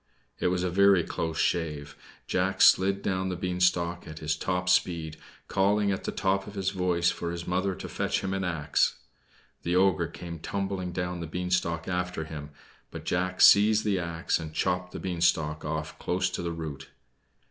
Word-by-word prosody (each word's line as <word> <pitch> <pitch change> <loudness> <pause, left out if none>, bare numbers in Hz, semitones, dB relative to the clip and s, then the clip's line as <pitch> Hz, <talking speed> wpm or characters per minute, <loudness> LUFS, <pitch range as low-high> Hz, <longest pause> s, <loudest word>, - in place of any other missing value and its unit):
It - - +1
was 90 0 0
a 90 - -1
very 100 -1 +5
close 80 0 -3
shave. 75 -4 -1 0.3
Jack 95 +1 0
slid 100 +1 +5
down 95 -1 -1
the 90 - -2
beanstalk 90 -1 0
at 80 - -8
his 75 -1 -1
top 90 -1 -2
speed, 85 -3 +1 0.3
calling 100 +1 +2
at 95 - -3
the - - -1
top 95 0 0
of 105 - -9
his 95 -1 -1
voice 90 -2 +1
for 85 - -4
his 85 0 -5
mother 95 +1 0
to - - -7
fetch - - -1
him 95 0 -2
an 95 0 -1
axe. 80 -5 +1 0.7
The 85 +1 -1
ogre 95 -2 +3
came 85 -2 -8
tumbling 95 0 -3
down 90 0 -3
the 85 - -5
beanstalk 90 -1 -1
after 90 -2 -2
him; 75 -2 -7 0.4
but - - -9
Jack 90 +1 -1
seized 105 +1 +7
the 100 -3 +1
axe 85 -1 -1
and 80 -1 -7
chopped 90 0 0
the - - -6
beanstalk 80 -4 0
off 80 0 -4
close 90 +1 0
to - - -3
the 85 - -2
root. 80 -4 -6
90 Hz, 180 wpm, -28 LUFS, 85-95 Hz, 0.7 s, seized